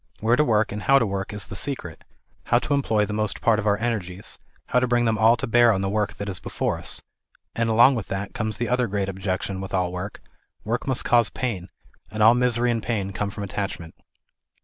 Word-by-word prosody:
Where 115 +2 +3
to 150 - +3
work 110 -6 +2
and 105 +1 -4
how 135 +4 +5
to 115 - +3
work 95 -1 -3
is 105 -1 -3
the - - -9
secret, 95 - -3 0.4
how - - +3
to - - -3
eir>ploy 120 -7 +2
the 105 - -5
most 105 -1 0
part 110 -2 +3
of 110 - -2
our 100 0 +3
energies, 100 -5 -4 0.3
how 125 - +2
to 125 - 0
bring 120 0 +2
them 110 -1 +1
all 115 +2 +5
to - - -2
bear 120 0 +5
on 95 -3 0
the 95 - -1
work 105 0 -1
that 100 - -6
is 95 -3 -3
before - - -2
us; - - -3 0.5
and 115 0 0
along 120 +5 +6
with 115 -6 -4
that 95 +1 -4
comes 110 -3 -3
the 120 - -2
other 125 -1 +1
great 100 -1 -2
ob 95 0 -7
jection 95 0 -2
with 95 0 -4
all 90 -1 0
work 90 +3 -6
ŌĆö - - -33 0.4
work 115 +5 -2
must 130 -2 0
cause 120 -2 +4
pain, 100 -8 -4 0.4
and 110 +1 -1
all 110 +2 +8
misery 120 -1 +2
and 115 -1 -1
pain 100 -4 -2
come 100 +1 -2
from 100 +1 -6
attachment. 95 -4 -5
110 Hz, 240 wpm, -24 LUFS, 95-120 Hz, 0.5 s, all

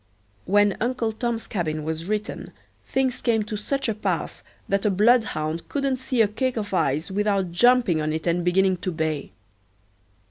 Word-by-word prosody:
When 205 +1 +3
"Uncle 240 -1 0
Tom's 230 0 -2
Cabin" 155 -5 -2
was 160 +1 -3
written 210 +2 -4 0.3
things 260 -2 0
came 225 -3 +2
to 215 +1 -5
such 275 +6 -2
a 225 - +1
pass 215 - -2 0.3
that 195 0 0
a 210 - +3
bloodhound 190 -7 +2
couldn't 275 -2 0
see 255 -2 +1
a - - +2
cake 250 +4 -2
of 205 -2 -3
ice 155 0 0
without 200 -2 0
jumping 235 -4 +4
on 155 0 -1
it 160 +1 -3
and 175 0 +1
beginning 185 +1 +3
to 185 +1 -3
bay. 155 -3 -2
205 Hz, 170 wpm, -24 LUFS, 170-235 Hz, 0.3 s, jumping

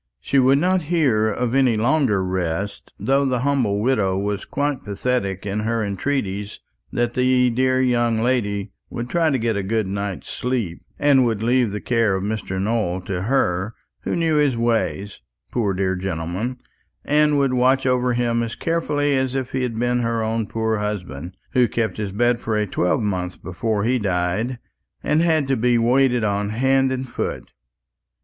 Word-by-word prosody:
She 140 - +1
would 130 +1 +5
not 180 +4 +2
hear 135 -11 +2
of 120 +2 -2
any 130 -4 +3
longer 115 -3 +2
rest 95 +1 -3
though 135 +7 +2
the 130 -3 0
humble 125 -7 +1
widow 105 -5 +1
was 100 0 -2
quite 145 -2 -2
pathetic 100 -2 -2
in 100 +1 -2
her 110 0 -1
entreaties 100 -1 -3 0.3
that 120 0 0
the 125 -1 +3
dear 130 +2 +2
young 120 -3 +2
lady 105 -5 0 0.2
would 120 +1 -5
try 165 -2 +2
to 140 - +1
get 115 -2 0
a - - 0
good 110 +2 0
night's 100 0 -4
sleep, 120 -9 -3 0.2
and 140 -3 +4
would 110 -2 -1
leave 120 0 +3
the 105 +1 -4
care 115 -5 +1
of 95 - -2
Mr. 100 -2 -3
Nowell 100 -3 0
to 90 -1 -4
her, 100 -3 0 0.3
who - - -2
knew 165 -2 +1
his 145 -5 +2
ways, 115 -3 -1 0.3
poor 110 -5 0
dear 95 0 0
gentleman, 95 +6 -3 0.5
and 150 0 +3
would 135 -2 +2
watch 130 +2 +3
over 125 -1 +2
him 120 -1 +1
as 115 -1 -3
carefully 145 -4 0
as 130 0 0
if 130 -2 -2
he 130 - -1
had 120 -3 -2
been 120 +1 +1
her 115 -1 0
own 110 0 -1
poor 110 -1 -1
husband, 90 -6 -5
who 125 -1 +4
kept 115 -1 -2
his 105 -2 -3
bed 120 +4 +1
for 110 -2 -1
a 105 - +1
twelvemonth 90 -1 -1
before 100 +4 -2
he 125 +3 +1
died, 100 +5 -1 0.5
and 150 +2 +2
had 160 -4 +2
to 135 - +2
be 120 0 +2
waited 125 0 +3
on 100 -1 0
hand 135 +4 +2
and 130 0 -3
foot. 120 - -4
115 Hz, 175 wpm, -22 LUFS, 100-130 Hz, 0.5 s, would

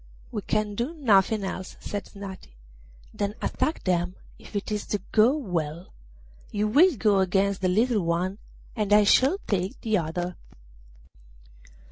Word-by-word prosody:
'We 210 - -3
can 215 -1 0
do 240 +10 -3
nothing 215 - +3
else,' 190 -1 -5
said 205 -1 -5
Snati, 195 - -10 0.6
'than 205 +1 -2
attack 310 - -1
them, 180 0 0 0.2
if - - -14
it 205 +1 -3
is 210 -1 -3
to 205 - -1
go 230 +7 +4
well; 170 - -4 0.6
you 210 +1 0
will 295 - +5
go 205 -2 +3
against 195 +1 +1
the 185 - +2
little 220 +3 +2
one, 180 +4 -1 0.4
and 210 -3 0
I 210 0 +7
shall 265 - +4
take 190 -1 -1
the 220 -3 +1
other. 175 +2 -3
200 Hz, 145 wpm, -26 LUFS, 185-215 Hz, 0.6 s, I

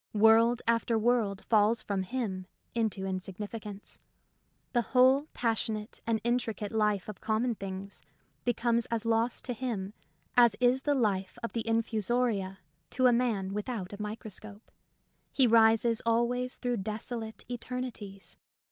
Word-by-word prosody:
World 225 +3 +5
after 230 0 +2
world 220 -3 +1
falls 220 +1 +3
from 200 -2 -1
him 190 -3 -3 0.3
into 220 -4 -1
insignificance; 200 +2 -6 0.7
the 240 - +3
whole 260 +4 +4
passionate 220 -2 -2
and 225 -1 +2
intricate 230 -3 -1
life 210 -3 +1
of 210 -4 -8
common 225 +3 +1
things 195 -1 -7 0.4
becomes 235 -1 +1
as 230 -1 -2
lost 230 +1 +1
to 250 - -2
him 215 -5 -4 0.4
as 235 -4 +6
is 250 +1 +3
the 290 +1 +1
life 195 -7 0
of 230 - -4
the 230 -1 -3
infusoria 225 -3 0 0.3
to 255 0 +1
a 245 - +6
man 220 -6 0
without 210 -2 -4
a 205 - -7
micro 215 +1 -5
scope. 210 +2 -10 0.6
He 265 - +4
rises 225 0 +4
always 240 +2 +1
through 245 -1 -1
desolate 220 +2 -5
eternities. 245 -5 -6
225 Hz, 135 wpm, -30 LUFS, 205-240 Hz, 0.7 s, as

